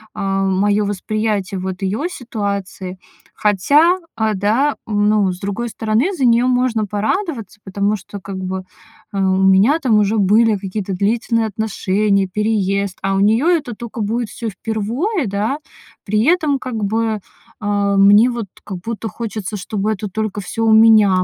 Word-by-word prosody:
а, 195 0 -1
моё 200 +2 +2
восприятие 205 -1 -2
вот 185 +1 -5
её 215 - -1
ситуации. 200 - -5 0.4
Хотя, 290 - +3 0.2
а, 220 -1 0
да, 220 +9 +1
ну, 205 -2 +2
с 180 - -8
другой 205 +5 -3
стороны, 225 - 0
за 275 -8 0
неё 240 +1 +4
можно 245 -4 +1
порадоваться, 220 - -3
потому 200 +2 0
что 200 +1 -9
как 190 +1 -7
бы, 185 0 -4 0.5
э, 200 - -2
у 190 0 +2
меня 195 +10 +5
там 240 -9 +2
уже 210 +2 +1
были 215 +3 +4
какие-то 195 0 -4
длительные 225 +4 0
отношения, 200 -2 0
переезд, 200 -1 -1
а 195 - 0
у 195 - +1
неё 220 +9 +3
это 275 -8 -4
тока 235 0 -6
будет 225 +2 -1
всё 230 -2 -5
впервой, 230 - -2
да. 210 +8 -1 0.4
При 215 +2 +1
этом 310 -3 +2
как 250 -5 -4
бы, 220 +1 0 0.4
э, 205 -1 +1
мне 205 +5 +6
вот 235 -4 -4 0.2
как 190 -3 -6
будто 225 +4 -5
хочется, 215 -2 -5
чтобы 205 +2 -2
это 210 -1 -4
только 215 +1 -3
всё 225 +4 -3
у 220 - +5
меня 215 -4 +6
210 Hz, 160 wpm, -18 LUFS, 195-230 Hz, 0.5 s, мне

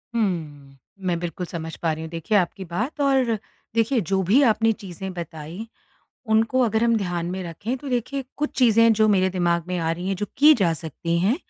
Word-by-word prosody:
हुँ। 150 -10 -2 0.3
मैं 170 -2 0
बिल्कुल 175 +1 -4
समझ 165 -2 -6
पा 165 -2 0
रही 160 +1 -6
हूँ, 160 - -6
देखिए 185 +6 0
आपकी 185 +1 -1
बात 230 - -3
और 265 -5 +2 0.4
देखिए 230 +2 +2
जो 190 +2 0
भी 225 +11 +4
आपने 225 -1 +3
चीजें 190 -2 -7
बताईं, 170 +3 -7 0.7
उनको 225 +4 +3
अगर 220 -1 +1
हम 230 -1 +3
ध्यान 175 -5 -2
में 185 0 -4
रखें 205 +9 -4
तो 280 +2 -8
देखिए 260 +2 -2
कुछ 300 +1 -1
चीजें 230 -3 +5
हैं 230 0 +6
जो 215 0 +3
मेरे 190 -2 +3
दिमाग 170 -2 0
में 180 -1 -1
आ 165 -1 0
रहीं 175 +2 -5
हैं 195 - 0
जो 205 - -3
की 300 +2 +8
जा 180 -7 +2
सकती 165 +2 -3
हैं। 205 - +2
190 Hz, 210 wpm, -23 LUFS, 170-230 Hz, 0.7 s, की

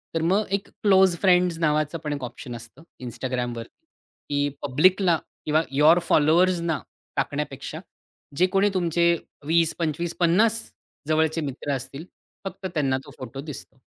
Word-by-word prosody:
तर 165 - +1
मग 190 +6 +2
एक 200 0 -1
क्लोज 190 -3 +4
फ्रेंड्स 180 -3 +4
नावाचा 155 0 +1
पण 150 -1 -2
एक 140 -3 -5
ऑप्शन 120 0 -7
असतं 115 +7 -12 0.2
Instagramवर, 120 -1 -3 0.7
की 145 0 +1
पब्लिकला 170 +6 +3 0.3
किंवा 155 +1 +3
यूअर 155 +5 +5
फॉलोवर्सना 170 +1 +3 0.4
टाकण्यापेक्षा - - -3 0.6
जे 180 - +5
कोणी 195 +1 +4
तुमचे 170 -1 +2 0.3
20-25-50 170 +6 +1 0.5
जवळचे 160 +1 +1
मित्र 145 0 -4
असतील 135 +5 -7 0.4
फक्त 195 - -7
त्यांना 135 -4 +1
तो - - -12
फोटो 130 +1 -7
दिसतो. 145 -2 -10
160 Hz, 125 wpm, -24 LUFS, 145-180 Hz, 0.7 s, यूअर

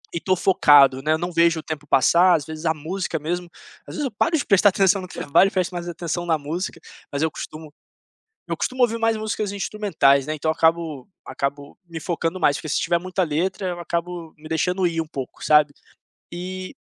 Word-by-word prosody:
E - - 0
tô 185 -1 +1
focado, 145 -8 +5
né, 155 +2 +1
não 175 +2 -4
vejo 170 -1 +3
o - - -9
tempo 150 -2 -6
passar. 170 +7 +5
Às 145 -4 -2
vezes, 155 +1 -8
a 160 - +3
música 165 +3 -3
mesmo 175 +3 -4 0.4
às - - -8
vezes 295 - -2
eu 260 - -3
paro 320 +10 +1
de 285 - -2
prestar 205 0 +5
atenção 195 0 +2
no 185 - -8
trabalho 160 +2 +2
e - - -4
presto 185 -1 -1
mais 175 0 -5
atenção 170 0 -4
na 160 -2 +2
música, 160 +6 -5 0.3
mas 140 +2 -1
eu 160 - +1
costumo 155 -1 -9 0.8
eu - - -2
costumo 255 0 -1
ouvir 230 -1 +2
mais 225 -1 +1
músicas 215 -1 -3
instrumentais, 190 -10 +1
né, 155 - -2
então 155 +1 -1
acabo 160 -3 0 0.2
acabo 140 +1 -5
me 165 -1 -7
focando 170 +2 -2
mais, 145 -2 +3
porque 155 - -7
se - - 0
tiver 170 - +1
muita 185 +2 -2
letra, 180 +4 -1
eu 175 - -4
acabo 170 -1 -4
me 155 +1 -12
deixando 180 +4 0
ir 165 -1 -2
um 160 - -4
pouco, 135 -4 -7
sabe? 150 -1 +4 0.6
E 185 +1 -6
170 Hz, 210 wpm, -22 LUFS, 155-185 Hz, 0.8 s, focado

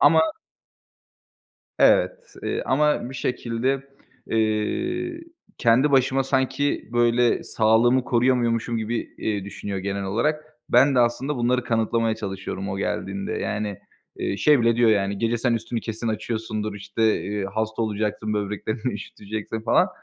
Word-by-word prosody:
ama 160 +2 +6 1.6
Evet, - - +3
eee, - - -2
ama 140 -2 +2
bir - - -9
şekilde, 125 +2 -1 0.5
eee, 330 - -1 0.4
kendi 125 +5 +4
başıma 135 0 +3
sanki 135 +2 0
böyle 120 0 +3
sağlığımı 120 +3 +3
koruyamıyormuşum 120 -2 +1
gibi, 115 +2 -1 0.2
eee, 105 -3 -2
düşünüyor 100 0 -5
genel 100 +1 -3
olarak. 150 +10 0 0.2
Ben 135 +3 +5
de 125 - +3
aslında 130 +4 0
bunları 125 +1 +1
kanıtlamaya 115 0 +1
çalışıyorum 95 -2 -5
o 95 - -3
geldiğinde. 95 0 -3
Yani, 105 -1 -3 0.4
eee, 100 - -2
şey 145 +3 +4
bile 115 0 +3
diyor, 120 -2 +5
yani, 100 -1 +1
"Gece 115 0 0
sen 120 -1 +1
üstünü 115 +1 -3
kesin 115 +1 -4
açıyorsundur, 110 -1 -3
işte, 105 +2 -4 0.2
eee, 105 0 -3
hasta 110 +1 -1
olacaksın, 105 0 -2
böbreklerini 105 +4 -2
üşüteceksin." 105 +2 -6
falan. 115 +1 +3
115 Hz, 130 wpm, -24 LUFS, 105-125 Hz, 1.6 s, ama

